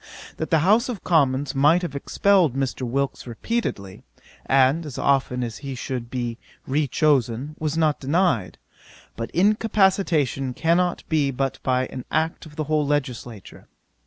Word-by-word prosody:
That 160 Hz, -, -4 dB
the 160 Hz, -, +3 dB
House 225 Hz, +7 st, +4 dB
of 225 Hz, -6 st, -5 dB
Commons 140 Hz, -4 st, +2 dB
might 150 Hz, +6 st, +4 dB
have 145 Hz, -5 st, -4 dB
expelled 180 Hz, -, +2 dB
Mr. 135 Hz, -1 st, -2 dB
Wilkes 135 Hz, +2 st, -2 dB
repeatedly, 115 Hz, -, -4 dB, 0.5 s
and 135 Hz, +4 st, +3 dB
as 145 Hz, -5 st, -8 dB
often 130 Hz, -2 st, +1 dB
as 115 Hz, -4 st, -5 dB
he 135 Hz, -2 st, -6 dB
should 125 Hz, -1 st, -5 dB
be 120 Hz, -2 st, -4 dB, 0.3 s
re 145 Hz, +2 st, 0 dB
chosen, 135 Hz, -1 st, +1 dB
was 155 Hz, 0 st, -2 dB
not 155 Hz, -2 st, +2 dB
denied; 135 Hz, -, 0 dB, 0.6 s
but 115 Hz, 0 st, -5 dB
incapacitation 190 Hz, -, +1 dB
cannot 170 Hz, +2 st, +1 dB
be 150 Hz, -3 st, +1 dB
but 135 Hz, 0 st, -2 dB
by 130 Hz, 0 st, +1 dB
an 130 Hz, -1 st, -7 dB
act 160 Hz, +1 st, -1 dB
of 150 Hz, -, -15 dB
the 155 Hz, -, -2 dB
whole 155 Hz, 0 st, +1 dB
legislature. 125 Hz, -7 st, -4 dB
140 Hz, 150 wpm, -23 LUFS, 130-165 Hz, 0.6 s, House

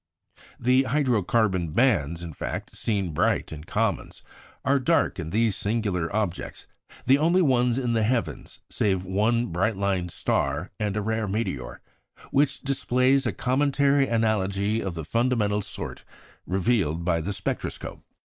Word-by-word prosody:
The 125 Hz, +2 st, +4 dB
hydro 130 Hz, -5 st, +1 dB
carbon 95 Hz, -6 st, +1 dB
bands, 85 Hz, -, +2 dB
in 85 Hz, -2 st, -7 dB
fact, -, -, -5 dB
seen 100 Hz, -7 st, -1 dB
bright -, -, +1 dB
in 75 Hz, 0 st, -8 dB
comets, -, -, -2 dB, 0.4 s
are 140 Hz, +1 st, +3 dB
dark 160 Hz, -, +1 dB
in 80 Hz, -2 st, -4 dB
these 110 Hz, +1 st, +1 dB
singular 100 Hz, -6 st, -1 dB
objects 100 Hz, -4 st, -3 dB, 0.4 s
the 135 Hz, +3 st, +5 dB
only 170 Hz, +4 st, +3 dB
ones 125 Hz, -4 st, +2 dB
in 125 Hz, -3 st, 0 dB
the 115 Hz, -, +2 dB
heavens 105 Hz, -, -2 dB
(save 95 Hz, -3 st, 0 dB
one 110 Hz, +6 st, +1 dB
bright 100 Hz, +5 st, 0 dB
line 95 Hz, -3 st, 0 dB
star 75 Hz, +1 st, -1 dB
and 105 Hz, -1 st, -1 dB
a 105 Hz, -, -1 dB
rare 110 Hz, 0 st, -1 dB
meteor) 95 Hz, -, -3 dB, 0.5 s
which 140 Hz, 0 st, +2 dB
display 130 Hz, -1 st, +2 dB
a 135 Hz, -4 st, +2 dB
cometary 140 Hz, +5 st, +2 dB
analogy 110 Hz, -2 st, 0 dB
of 95 Hz, -3 st, -4 dB
the 80 Hz, -2 st, -5 dB
fundamental 110 Hz, 0 st, +1 dB
sort -, -, -7 dB, 0.4 s
revealed 90 Hz, -4 st, 0 dB
by 85 Hz, -2 st, +1 dB
the 95 Hz, +6 st, -3 dB
spectroscope. 100 Hz, -2 st, -4 dB
110 Hz, 145 wpm, -25 LUFS, 90-125 Hz, 0.5 s, the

